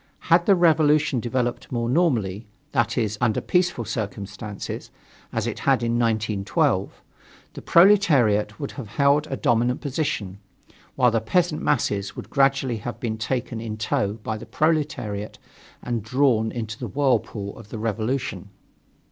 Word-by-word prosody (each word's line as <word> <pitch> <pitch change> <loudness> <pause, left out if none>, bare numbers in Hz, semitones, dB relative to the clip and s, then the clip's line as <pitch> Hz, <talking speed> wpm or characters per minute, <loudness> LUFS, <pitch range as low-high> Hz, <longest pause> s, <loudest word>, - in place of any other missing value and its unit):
Had 170 0 +4
the 200 - +6
revolution 155 -5 +3
developed 120 +1 -2
more 120 -2 -1
normally 120 - +1 0.2
that 120 -1 0
is, 110 -3 -1
under 115 -3 +2
peaceful 175 -10 0
circumstances, 105 -1 -5 0.4
as - - -2
it - - -3
had 120 - +2
in 120 0 0
1912 110 -4 0 0.5
the - - -8
proletariat 145 - +4
would 140 - -4
always - - -16
have - - -16
held 145 +2 +3
a 135 -3 -4
dominant 120 +2 +1
position, 135 - -3 0.6
while 125 -2 +4
the 115 0 +1
peasant 165 +7 +1
masses 100 -7 0
would - - -9
gradually 135 -3 +2
have 120 +3 -6
been 110 -2 -3
taken 120 0 -3
in 110 -2 -5
tow 105 -2 0
by 110 0 -5
the 115 - -10
proletariat 140 -10 -1 0.5
and 120 -2 -2
drawn 110 -1 +2
into 110 -2 -5
the - - -4
whirlpool 120 -7 -1
of 110 -3 -13
the 115 - -6
revolution. 110 -2 -2
120 Hz, 150 wpm, -24 LUFS, 110-140 Hz, 0.6 s, the